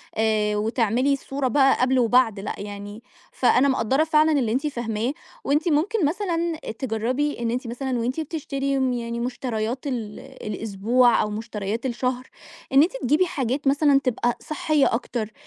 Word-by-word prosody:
آآ 215 -1 +1
وتعملي 230 +5 +1
الصورة 275 0 -2
بقى 270 +1 +3
قبل 260 +1 +3
وبعد، 235 -3 +3
لأ 195 - -4
يعني 205 +2 -8 0.3
فأنا 255 +2 +3
مقدرّة 265 +2 +2
فعلًا 315 0 +3
اللي 260 -7 +1
أنتِ 270 +6 0
فاهماه 235 -2 -2 0.3
وأنتِ 295 +5 +1
ممكن 340 +6 +1
مثلًا 340 0 -1 0.2
تجربي 255 +5 -1
إن 235 -1 -1
أنتِ 250 +1 -3
مثلًا 250 +1 -3
وأنتِ 250 +6 -2
بتشتري 275 -3 -2
امم 260 -1 +1
يعني 235 -1 -3
مشتريات 245 0 -3
ال 225 -6 -4
الأسبوع 230 -1 +1
أو 210 - -1
مشتريات 215 +1 -4
الشهر، 250 0 -2 0.5
إن 275 +2 +7
أنتِ 340 - 0
تجيبي 310 +5 +3
حاجات 275 -4 -2
مثلًا 285 0 +4
تبقى 240 -1 0
صحية 305 -1 +1
أكتر 230 -2 -3
255 Hz, 150 wpm, -24 LUFS, 225-280 Hz, 0.5 s, إن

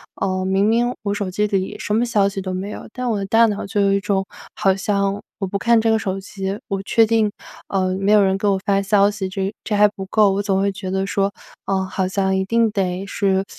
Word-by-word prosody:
呃， 185 -1 -1
明 190 +2 +2
明 235 +2 +2
我 200 -1 -1
手 205 -2 -3
机 210 +3 0
里 195 -2 -2
什 210 - -3
么 225 +3 +2
消 215 -5 +2
息 195 0 -4
都 185 0 -4
没 190 +3 -4
有， - - -8
但 250 +1 -4
我 - - 0
的 195 - -3
大 225 +3 +5
脑 210 -2 -2
就 205 +1 -2
有 200 -1 +3
一 200 - +2
种 195 -1 -1 0.3
好 195 -3 +2
像 200 0 -1 0.2
我 195 - -2
不 200 +1 -3
看 235 +1 +4
这 225 0 +2
个 220 - +2
手 195 -2 -3
机 195 +1 -5
我 195 -1 -2
确 225 +3 +3
定， 220 -1 +2 0.4
呃， 185 -1 0
没 195 +1 +1
有 210 -1 +6
人 190 0 +2
给 195 +2 -1
我 195 -1 +3
发 200 -1 +2
消 200 +1 +3
息， 200 -2 -4
这 195 +1 -3
这 215 - -1
还 210 0 +6
不 200 -1 -8
够。 210 0 +4
我 200 - 0
总 195 -2 0
会 200 +1 +1
觉 195 -1 -6
得 190 +1 -1
说， 195 0 0 0.3
呃， 190 -1 0
好 190 0 -2
像 190 0 0
一 190 - +1
定 230 +2 +2
得 190 -2 -2
是 195 -1 0
200 Hz, 275 characters per minute, -20 LUFS, 190-210 Hz, 0.4 s, 有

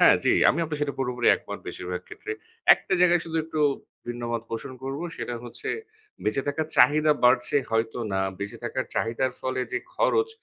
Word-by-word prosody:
হ্যাঁ, - - +8
জি, - - +5 0.2
আমি 155 - +3
আপনার 150 -2 -4
সেটা 145 -1 -1
পুরোপুরি 125 -2 -1
একমত - - -3
বেশিরভাগ 90 0 -4
ক্ষেত্রে। 430 - -6 0.4
একটা - - -7
জায়গায় 175 -1 +5
শুধু 165 -1 -4
একটু 160 -1 -3 0.5
ভিন্নমত 120 -1 -3
পোষণ 115 +3 -4
করব। 135 +2 -3 0.2
সেটা 120 - -4
হচ্ছে 120 - -6 0.6
বেঁচে 110 +6 +1
থাকার 150 +2 -1
চাহিদা 150 +1 +6
বাড়ছে 125 +3 +4
হয়তো 115 +1 0
না। 95 - +1 0.2
বেঁচে 100 0 -5
থাকার - - -2
চাহিদার 115 +3 0
ফলে 130 0 -1
যে, 125 - +1 0.2
খরচ 450 -3 +2
130 Hz, 175 wpm, -26 LUFS, 115-155 Hz, 0.6 s, হ্যাঁ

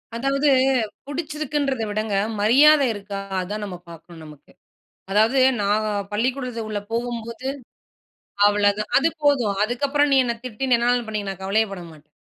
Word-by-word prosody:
அதாவது 275 +4 +1 0.6
பிடிச்சிருக்குதுங்கறத 295 -4 -3
விடங்க 215 0 -2 0.3
மரியாத 285 +7 +6
இருக்கா, 200 -1 -7 0.2
அத 180 - -4
தான் 210 0 -4
நம்ப 180 -3 -7
பாக்கணும் 165 0 -13
நமக்கு. 150 -2 -15 0.6
அதாவது 220 +6 +3 0.2
நான் 205 +2 +1 0.3
பள்ளிக்கூடத்துக்கு 245 0 -2
உள்ள 205 -1 -2
போகும்போது 235 +1 -4 1.0
அவ்வளவுதான் 205 0 +1
அது 305 +4 +2
போதும். 250 -9 +2
அதுக்கு 245 +6 0
அப்புறம் 290 +1 +2
நீ - - +5
என்ன 235 -1 -1
திட்டி 250 +2 -5
என்ன 250 - +3
வேணாலும் 240 0 +1
பண்ணிக்க 210 -2 -4
நான் 190 -1 -8
கவலையே 215 +3 +1
படமாட்டேன். 165 -5 -11
225 Hz, 140 wpm, -22 LUFS, 205-270 Hz, 1.0 s, மரியாத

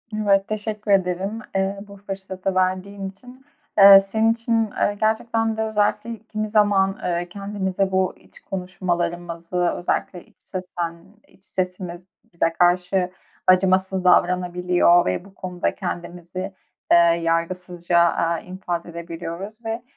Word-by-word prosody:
Evet, 200 -2 +2
teşekkür 215 -1 -3
ederim, 190 +3 +1 0.2
eee, 195 +1 0
bu 200 0 -12
fırsatı 195 -1 -5
verdiğin 190 +1 -1
için. 250 +7 -15 0.3
Iıı, 195 0 +11
senin 220 +3 +2
için, 230 -2 0
ııı, 205 - 0
gerçekten 220 +1 0
de - - -1
özellikle 220 +1 0
kimi 215 -1 -4
zaman, 205 -2 +3
ııı, 175 0 -1
kendimize 195 -1 -2
bu 185 -1 +1
iç - - -14
konuşmalarımızı, 175 -2 -3 0.2
özellikle 175 0 -2
iç - - -28
sesten 175 -3 -4 0.3
iç 190 - -16
sesimiz 180 -1 -3 0.3
bize 165 -1 +1
karşı 180 +1 +2 0.4
acımasız 185 0 +3
davranabiliyor 180 -1 +3
ve 90 - -2
bu 195 - -16
konuda 180 -1 -3
kendimizi, 180 +1 -5 0.4
eee, - - +8
yargısızca, 170 +1 +1
aaa, 170 -1 +2
infaz 180 -2 -5
edebiliyoruz. 170 +6 -7
Ve 225 +1 -3
185 Hz, 125 wpm, -22 LUFS, 175-200 Hz, 0.4 s, Iıı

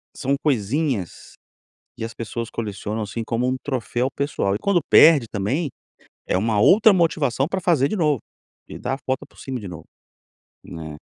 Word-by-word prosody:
São 140 0 0
coisinhas 130 - -1 0.6
que - - -5
as 115 - -6
pessoas 115 0 -5
colecionam 110 0 -4
assim, 105 +2 -4
como 115 +2 -1
um 130 - 0
troféu 130 -1 -2
pessoal. 140 -8 -1
E - - -2
quando 200 - +2
perde 155 -6 +7
também, 130 - -1 0.6
é - - +1
uma 105 +1 +1
outra 210 - +6
motivação 150 -7 +1
pra 190 +3 -2
fazer 165 -7 +2
de 215 - -3
novo. 150 - +2 0.5
E - - -8
dar - - -3
a - - -12
volta 130 0 -1
por - - -21
cima 130 -2 -5
de 100 - -8
novo, 80 -3 -9 0.8
né. 80 -2 -8
130 Hz, 175 wpm, -22 LUFS, 105-150 Hz, 0.8 s, perde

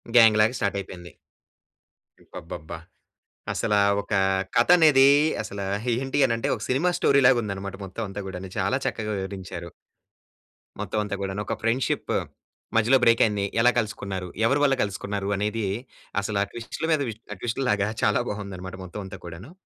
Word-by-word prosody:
గ్యాంగ్‌లాగా 110 0 +6
start 100 -1 0
అయిపోయింది. 90 -2 -9 1.1
అబ్బబ్బబ్బా! 80 -1 -8 0.8
అసలా 105 - +1 0.2
ఒక 100 +1 -9 0.4
కథ 120 - +4
అనేది 145 -5 +6 0.4
అసల 100 0 -7 0.3
ఏంటి 135 +3 -2
అని 115 - 0
అంటే, 115 - -2
ఒక - - -10
సినిమా 140 +8 +2
స్టోరీ 140 0 +4
లాగా 125 -1 +6
ఉందన్నమాట 100 -2 -5
మొత్తం 95 +4 -6
అంతా 100 +1 -6
గుడాను. 95 0 -7
చాలా - - +1
చక్కగా 110 -1 -2
వివరించారు. 95 -3 -6 1.1
మొత్తం 105 +1 -2
అంతా 105 -1 -3
గుడాను. 95 +1 -3
ఒక - - -1
ఫ్రెండ్షిప్ 115 +4 0 0.6
మధ్యలో 115 +4 +5
బ్రేక్ 115 0 +5
అయింది. 105 -2 0 0.2
ఎలా 125 +1 +6
కలుసుకున్నారు? 100 -4 -4 0.2
ఎవరి 135 +5 +3
వల్ల 135 -2 +4
కలుసుకున్నారు? 100 0 -3
అనేది 105 +2 -1 0.6
అసలు 100 0 -2
ఆ - - -3
ట్విస్ట్‌ల 120 +7 -5
మీద, 155 -2 +3 0.3
ఆ - - -8
ట్విస్ట్ 120 +3 -2
లాగా 105 -1 +2 0.2
చాలా 105 - +3
బాగుందనమాట 95 -3 -6
మొత్తం 100 +4 -7
అంతా - - -9
కూడాను. 85 - -9
105 Hz, 150 wpm, -25 LUFS, 95-115 Hz, 1.1 s, గ్యాంగ్‌లాగా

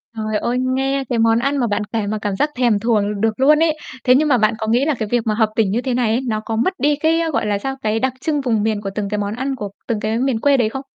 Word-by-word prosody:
Trời 215 -1 -2
ơi, 245 +3 -1 0.2
nghe 270 +1 0
cái 235 -2 0
món 225 0 +3
ăn 275 +3 0
mà 245 -3 +1
bạn 205 0 -1
kể 220 -3 -1
mà 215 +1 -2
cảm 200 -2 -2
giác 295 - +1
thèm 240 -5 +2
thuồng 210 -2 0
được 225 +1 0
luôn 300 +3 +5
ấy. 320 -1 +2 0.3
Thế 250 -1 +5
nhưng 305 +3 +3
mà 265 -4 +4
bạn 215 +1 +2
có 220 -1 -4
nghĩ 245 +5 +2
là 310 - +1
cái 215 - -2
việc 240 -1 +2
mà 215 - +2
hợp 220 0 +2
tỉnh 210 -4 +2
như 235 - 0
thế 255 -1 -2
này 240 -2 +1
ấy, 235 +4 +1
nó 215 -2 -1
có 225 - -2
mất 305 +12 +1
đi 290 +3 +2
cái, 320 +3 +1
gọi - - 0
là, 205 -1 0
sao, 270 +6 -4
cái 215 +1 0
đặc 260 +1 0
trưng 295 -1 0
vùng 225 -5 0
miền 215 -1 0
của 200 - -4
từng 205 -2 -2
cái 210 - -2
món 205 0 -2
ăn 270 +2 -2
của 205 -5 -5 0.2
từng 225 -2 -1
cái 215 +1 -1
miền 260 -3 0
quê 280 +3 +3
đấy 225 -4 +2
không? 270 - -5
230 Hz, 320 wpm, -19 LUFS, 215-270 Hz, 0.3 s, luôn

